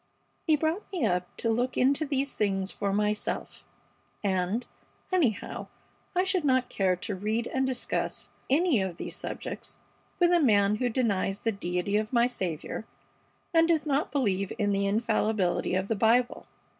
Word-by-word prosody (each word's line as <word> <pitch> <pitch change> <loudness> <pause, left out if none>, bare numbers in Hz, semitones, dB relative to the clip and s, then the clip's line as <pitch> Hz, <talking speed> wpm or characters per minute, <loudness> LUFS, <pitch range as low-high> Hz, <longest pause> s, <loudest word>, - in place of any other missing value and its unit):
He 315 - +6
brought 320 +8 -2
me 350 -10 0
up 180 -3 -1
to 230 - 0
look 245 +3 0
into 280 +4 +3
these 275 -1 -1
things 195 -2 0
for 200 - -2
myself. 210 +1 -1 0.6
And, 195 +4 0 0.5
anyhow, 275 - 0 0.5
I 365 - +4
should 375 -3 +1
not 260 -3 +2
care 190 -2 +1
to 205 +4 -4
read 215 +5 -1
and 265 +1 0
discuss 255 -2 -2 0.2
any 290 - +3
of 185 -3 -3
these - - -5
subjects - - -6 0.4
with 350 -1 +5
a 350 - +5
man 210 -7 +4
who 245 +2 0
denies 205 -5 0
the 225 - +1
deity 185 0 -1
of 215 0 -2
my 235 -1 +5
Saviour 190 -5 -3 0.7
and 330 0 +5
does 325 -2 +2
not 285 -2 0
believe 200 -9 0
in 205 -2 +1
the 200 0 +1
infallibility 210 -4 +1
of 190 +1 0
the 225 - 0
Bible. 235 +4 +2
225 Hz, 160 wpm, -28 LUFS, 200-270 Hz, 0.7 s, He